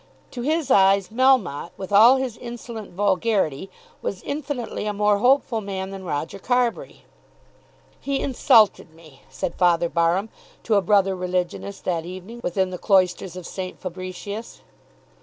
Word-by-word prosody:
To 245 - -6
his 300 +1 0
eyes 195 -2 +4
Melmotte, 225 - +2
with 190 0 -7
all 225 +6 +7
his 260 -4 -2
insolent 235 -2 -8
vulgarity, 190 -4 0 0.3
was 190 - -4
infinitely 275 -7 -4
a 210 - -1
more 210 0 +2
hopeful 250 -1 +2
man 190 -1 -5
than 195 -1 -8
Roger 165 +3 -4
Carbury. 245 +2 -1 1.0
"He 275 -1 -2
insulted 215 - +3
me," 155 -5 -17
said 130 - -4
Father 170 -2 +2
Barham 170 +6 +1 0.3
to 225 - 0
a 200 - +4
brother 195 -1 +2
religionist 180 +2 -3
that 170 -3 -1
evening 185 +7 -9
within 185 +1 0
the 180 - -6
cloisters 185 -2 +1
of 180 -2 -8
St. 185 +1 -6
Fabricius. 185 +4 -7
195 Hz, 140 wpm, -23 LUFS, 180-230 Hz, 1.0 s, all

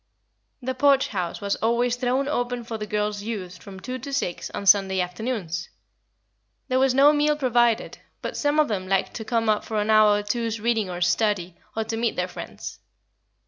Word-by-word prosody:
The 260 +1 -1
Porch 275 +1 +3
House 180 -3 -3
was 200 0 -1
always 235 +2 +1
thrown 255 +2 0
open 245 -4 -2
for 230 0 -6
the 210 - -4
girls' 210 0 -1
use 200 -5 -5
from 195 -2 -11
two 255 +6 -5
to 280 +3 -7
six 180 -10 -2
on 200 - -6
Sunday 195 -1 +5
afternoons. 180 -2 -3 1.0
There 255 0 +2
was 265 -1 +3
no 285 +2 +7
meal 300 0 +2
provided, 240 -5 +1 0.2
but - - -5
some 290 +1 +1
of 305 - +4
them 190 -3 -3
liked 195 -1 +1
to 225 - -5
come 225 0 0
up 210 -1 +2
for 215 -1 -2
an 210 +1 +1
hour 215 -1 +6
or 205 - -3
two's 230 +1 -2
reading 220 -3 0
or 175 0 -5
study, 180 -1 +1 0.2
or 220 - 0
to 225 +1 -4
meet 230 0 0
their 180 0 -1
friends. 180 - -8
225 Hz, 195 wpm, -24 LUFS, 200-250 Hz, 1.0 s, no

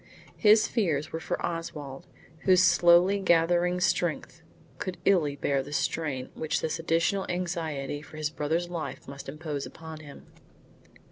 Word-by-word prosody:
His 215 0 +5
fears 160 - 0
were 160 - -2
for 165 - -3
Oswald, 155 -5 -6 0.3
whose 185 +1 +4
slowly 175 +2 +5
gathering 175 0 +3
strength 170 -2 -1 0.4
could 185 -3 -4
illy 160 -8 +3
bear 140 -1 0
the 140 +2 -9
strain 145 -3 -2
which 155 -1 -1
this 160 - -2
additional 165 +4 +1
anxiety 160 -5 -3
for 155 +1 -13
his 155 -1 -2
brother's 160 +3 -1
life 170 -2 -6
must 140 0 -8
impose 150 -1 -5
upon 160 -1 -10
him. 145 -2 -12
165 Hz, 140 wpm, -28 LUFS, 150-175 Hz, 0.4 s, His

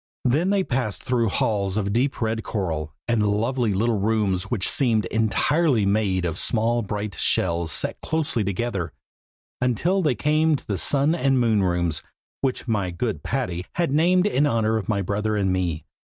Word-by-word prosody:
Then 150 +9 +2
they 200 -1 +2
passed 125 - -2
through 120 -3 +1
halls 100 -1 0
of 100 -1 -1
deep 130 +2 0
red 110 0 -1
coral, 80 -7 -3 0.2
and 110 -3 +2
lovely 115 +3 0
little 110 +2 +1
rooms 100 -3 0
which 105 -6 0
seemed 115 -7 +3
entirely 115 - +1
made 100 -3 +1
of 85 0 -2
small 120 +1 +1
bright 105 -1 -4
shells 85 0 0
set - - -2
closely 155 -8 -1
together, 100 -3 -2 0.7
until 165 - +1
they 150 -7 +1
came 155 +5 +2
to - - -7
the 100 -3 -2
Sun 145 +2 +2
and 135 -6 +2
Moon 110 -4 +2
rooms, 85 -4 0 0.4
which 130 -1 -2
my 100 -5 0
good 105 +6 -3
Patty 105 -10 -2
has 170 -1 0
named 175 +6 +3
in 150 -8 +2
honor 110 -4 +1
of 110 - -5
my 100 -2 0
brother 105 +3 -1
and 95 -2 +1
me. 90 -4 -2
110 Hz, 170 wpm, -23 LUFS, 100-130 Hz, 0.7 s, seemed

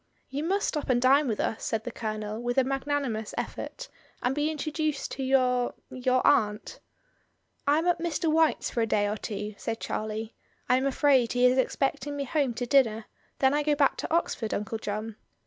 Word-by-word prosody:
"You 285 +3 -2
must 390 +5 +1
stop 300 -3 -3
and 245 -1 +4
dine 270 +3 +4
with 220 -3 -1
us," 220 - -1
said 220 -1 -1
the 245 - -5
Colonel, 215 -1 -4
with 245 +1 -2
a 265 - +6
magnanimous 270 -5 -2
effort, - - -5 0.4
"and 250 - +2
be 295 +2 0
intro 310 0 -3
duced 305 -2 -2
to 270 - -4
your 255 -2 +2
— - - -47
your 255 0 +1
aunt." 210 -7 +2 0.9
"I 290 +1 +5
am 325 - 0
at 350 -1 +2
Mr. 330 -1 -1
White's 320 -1 +2
for 235 - -1
a 225 - +1
day 205 -1 +2
or 210 - -1
two," 210 0 -5
said 225 0 -3
Charlie; 215 +1 -4 0.3
"I 250 - +4
am 265 +1 +1
afraid 270 -3 +3
he 245 0 +3
is 250 +1 +4
expecting 275 +2 -1
me 280 - -1
home 275 -3 0
to 245 - -2
dinner, 230 -5 +3 0.3
then 265 0 +3
I 295 - +2
go 295 0 +2
back 285 -2 +3
to - - -5
Oxford, 265 -9 0
Uncle 220 +2 -3
John. 215 +1 -4
255 Hz, 205 wpm, -28 LUFS, 225-290 Hz, 0.9 s, a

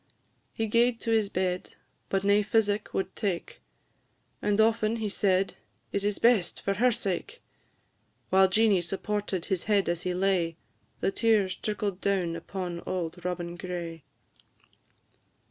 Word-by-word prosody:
He 225 - -2
gaed 230 +2 +3
to 230 - -1
his 220 -3 +3
bed, 185 -1 -2 0.3
but 195 0 0
nae 200 +1 +4
physic 210 0 +1
would 190 - -2
take, 195 -6 -3 0.8
And 210 0 +1
often 220 0 +3
he 220 -2 -2
said, 195 -1 +1 0.4
"It 200 - -1
is 205 -1 0
best, 225 -7 +3
for 195 - -1
her 245 +5 +3
sake!" 225 - -3 0.9
While 190 0 +6
Jeanie 210 -1 +4
supported 195 +1 -2
his 185 -3 -1
head 205 -2 +2
as 170 0 0
he 180 0 -2
lay, 180 -3 +1 0.5
The - - +2
tears 210 -4 +2
trickled 205 -3 -3
down 185 -4 0
upon 175 0 -5
auld 175 -1 -4
Robin 175 -1 -3
Gray. 175 -2 -5
195 Hz, 140 wpm, -28 LUFS, 180-215 Hz, 0.9 s, While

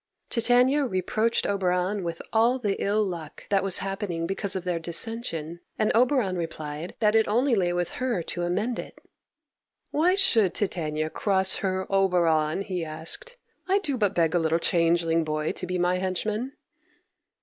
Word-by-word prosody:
Titania 250 +5 +3
reproached 220 +1 0
Oberon 185 0 0
with 170 -1 -5
all 230 +3 +4
the 205 -6 -2
ill 210 +2 +2
luck 170 -6 -6
that 195 -1 +2
was 195 -2 +2
happening 195 -4 -3
because 195 +2 -2
of 185 - -3
their 180 -2 -1
dissension, 170 -2 -3 0.2
and 215 - +2
Oberon 245 -5 +2
replied 160 -1 -5
that 210 -2 +2
it 220 -1 +3
only 245 +5 +2
lay 180 -5 +2
with 175 -1 -1
her 240 -9 0
to 175 - -4
amend 200 +8 -1
it. - - -8 0.9
"Why 345 +5 +3
should 225 - +4
Titania 155 -5 -2
cross 190 -2 +2
her 190 -1 -1
Oberon?" 175 -4 +2
he 185 -3 -3
asked. 165 - -6 0.3
"I 385 +1 +3
do 305 -9 -1
but 205 -5 0
beg 165 -2 +2
a 175 - +3
little 160 0 +1
changeling 165 -1 +2
boy 155 0 -1
to - - -5
be 180 +1 -2
my 180 +1 +1
henchman." 210 +7 -2
190 Hz, 160 wpm, -26 LUFS, 170-220 Hz, 0.9 s, all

